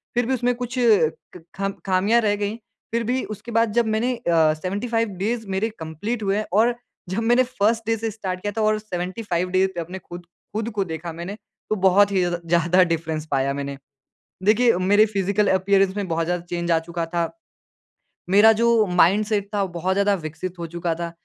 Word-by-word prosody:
फ़िर 245 - +2
भी 260 - 0
उसमें 245 -1 +1
कुछ 245 +1 -5
क, 180 -6 +1
खम 195 0 -1
ख़ामियाँ 195 +5 +3
रह 205 -1 +2
गईं, 205 +2 -3 0.4
फ़िर 235 0 +1
भी 250 +3 -1
उसके 230 +4 -11
बाद 230 -1 +2
जब 235 -1 +3
मैंने 245 +3 0
अ, 165 -8 +2
75 210 +7 -2
डेज़ 225 0 -2
मेरे 215 +4 0
कंप्लीट 205 +9 -4
हुए 200 +1 +1
और 235 +3 +3 0.3
जब 190 - -1
मैंने 240 +2 +4
फर्स्ट 230 -2 0
डे 225 - +1
से 225 0 -3
स्टार्ट 190 -4 -5
किया 205 +1 -2
था - - +1
और 215 0 +2
75 180 -2 -3
डे 190 +1 +4
पे 175 - -3
अपने 180 +3 -7
ख़ुद 175 0 -10
ख़ुद 215 +5 -6
को 200 - +1
देखा 165 0 -6
मैंने 175 +5 -6 0.3
तो 215 - +1
बहुत 200 +2 +5
ही 190 -2 +2
ज़्य 175 -1 -1
ज़्यादा 170 +2 +3
डिफ़्रेंस 160 -2 -2
पाया 135 0 +1
मैंने। 140 0 -5 0.7
देखिए 225 0 +4
मेरे 205 +3 +4
फ़िज़िकल 205 0 0
अपीयरेंस 195 +1 +2
में 200 -2 -2
बहुत 165 0 -1
ज़्यादा 175 0 -2
चेंज 170 0 -2
आ 165 - +4
चुका 170 0 -4
था। 170 -1 0 1.0
मेरा 210 +3 +7
जो 235 -2 +4
माइंड 180 +4 +3
सेट 205 -2 -1
था 205 - +1
वो - - -2
बहुत 180 +2 -1
ज़्यादा 200 0 +3
विकसित 175 +3 -6
हो 170 - -4
चुका 170 0 -2
था। 170 0 -4
195 Hz, 200 wpm, -23 LUFS, 175-220 Hz, 1.0 s, मेरा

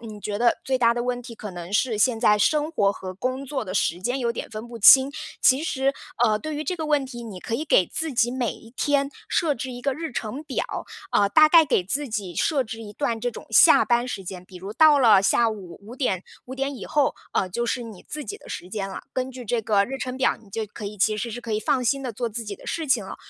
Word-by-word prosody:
你 215 -2 -9
觉 205 +1 -4
得 235 0 +3
最 260 -1 0
大 235 -1 +4
的 240 - -2
问 245 0 -2
题 235 -1 -10
可 215 -2 -8
能 175 -1 -8
是 215 +1 +1
现 230 0 +3
在 210 -3 +4
生 300 +8 +2
活 205 -11 +2
和 185 -2 -7
工 255 +7 -3
作 270 -2 -3
的 185 - -5
时 175 -2 0
间 245 +7 -1
有 235 -2 0
点 - - -6
分 215 +1 -7
不 235 -1 -9
清， 265 +6 +8 0.3
其 265 +3 +5
实 275 -3 0 0.3
呃， 215 -2 +2
对 310 +5 -5
于 300 - -3
这 365 +3 -3
个 315 -2 -4
问 295 -2 +2
题， 240 -2 -8
你 195 -5 -8
可 230 - -4
以 300 - -2
给 230 - +4
自 320 -2 -2
己 240 0 +2
每 250 -3 -1
一 225 - -15
天 280 +2 0 0.2
设 310 -4 +1
置 255 +2 -5
一 245 - -8
个 275 0 +1
日 320 0 -5
程 235 +7 -4
表。 - - -2 0.5
呃， 200 - +3
大 305 +9 +6
概 330 0 +7
给 265 -10 +1
自 275 +9 -2
己 205 -6 -4
设 285 - +1
置 225 0 -7
一 210 -2 -9
段 235 -4 -2
这 245 +2 -1
种 - - -10
下 - - +7
班 240 0 +2
时 200 - -5
间， 180 0 -7
比 185 0 -13
如 195 +3 -7
到 300 +3 +6
了 220 -6 +6
下 230 +3 +3
午 190 -6 -9
5 220 +4 -10
点 195 -10 -1 0.2
5 260 - -7
点 275 +1 -3
以 - - -8
后， 290 -2 +1 0.2
呃， 185 - 0
就 235 +6 -2
是 245 +1 -1
你 220 -5 -11
自 300 -2 -5
己 415 - -6
的 - - -16
时 180 - -6
间 195 -1 -4
了。 190 - -6
根 255 0 -2
据 255 -1 -9
这 230 +1 0
个 205 -2 +3
日 270 +5 -5
程 255 -1 -4
表， 265 - +2
你 205 - -19
就 220 +2 -3
可 210 +1 -10
以 205 +1 -6
其 210 +2 +2
实 230 +3 -3
是 245 - -6
可 230 -2 -5
以 215 - 0
放 255 +3 0
心 275 +3 +1
地 250 -3 -4
做 240 +2 -3
自 230 +1 -5
己 210 -1 -5
的 - - -15
事 325 -2 -3
情 245 -7 +2
了。 - - -8
240 Hz, 290 characters per minute, -24 LUFS, 210-270 Hz, 0.5 s, 清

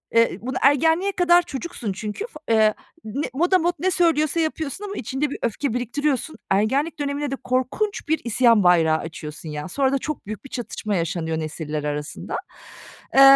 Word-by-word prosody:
eee, 230 0 +4
bunu 255 +2 -3
ergenliğe 320 +7 +4
kadar 350 -1 +5
çocuksun 270 - -5
çünkü, 210 - -4
fa 305 - -13
eee, 215 -1 +5 0.3
ne 240 +7 -3
motamot 350 +3 +3
ne 375 +3 +1
söylüyorsa 330 -2 +2
yapıyorsun 315 +3 -2
ama 405 - -5
içinde 265 +5 -2
bir - - -5
öfke 235 +2 -1
biriktiriyorsun. 265 +4 -1 0.2
Ergenlik 270 +11 +1
dönemine 285 0 -2
de - - 0
korkunç 260 - -1
bir 315 +1 +2
isyan 235 -2 +4
bayrağı 165 -3 +5
açıyorsun 155 -1 -7
ya, 150 +3 -5
sonra 265 +6 +1
da - - +3
çok 305 +3 -5
büyük 215 +5 -6
bir - - -9
çatışma 215 -4 -3
yaşanıyor 165 -1 -1
nesiller 155 -1 -4
arasında. 150 0 -4 0.8
Eee, 270 - +8
260 Hz, 165 wpm, -23 LUFS, 205-315 Hz, 0.8 s, Eee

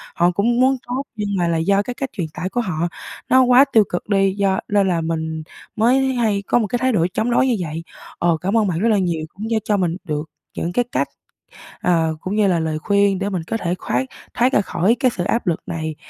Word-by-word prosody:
Họ 175 +1 +3
cũng 235 +6 +1
muốn 265 +1 +4
tốt, 255 +3 -2
nhưng 210 -2 -3
mà 175 -1 +1
là 165 -1 +1
do 195 +5 +2
cái 250 - -5
cách 270 +1 -4
truyền 175 -4 -3
tải 185 - -4
của 245 - -1
họ 170 -5 -1 0.4
nó 260 - +6
quá 250 +2 +6
tiêu 220 -2 +7
cực 175 +4 -4
đi, 195 -1 +3
do 195 -1 +1
nên 200 -2 +2
là 170 -2 +1
mình 160 -1 -3 0.3
mới 260 +4 +3
hay 215 -5 +1
có 240 - +3
một 215 - 0
cái 240 +4 -1
thái 260 +1 +2
độ 175 -8 +2
chống 230 +5 0
đối 260 +2 +3
như 245 - +2
vậy. 165 -1 -4 0.4
Ờ, 170 -2 +2
cảm 195 +5 +1
ơn 215 - +3
bạn 170 -3 -1
rất 230 +4 +2
là 215 - +3
nhiều, 170 -4 -1
cũng 215 +3 -6
như 225 -1 +1
cho 210 - +1
mình 175 -2 0
được 155 -3 -4 0.3
những 175 +1 -2
cái 245 +2 +1
cách, - - 0 0.7
ờ, 165 -3 +1
cũng 190 +3 -3
như 210 -2 +3
là 175 -3 +2
lời 155 -1 -2
khuyên 200 +1 +2
để 200 - -1
mình 185 -5 -3
có 225 - -3
thể 175 -3 -2
khoác 260 - -2 0.3
thoát 250 +2 +2
ra 205 - +4
khỏi 195 +5 +1
cái 255 -2 +3
sự 175 - -3
áp 230 +1 -1
lực 165 - +1
này, 160 -2 -4
195 Hz, 255 wpm, -20 LUFS, 170-230 Hz, 0.7 s, tiêu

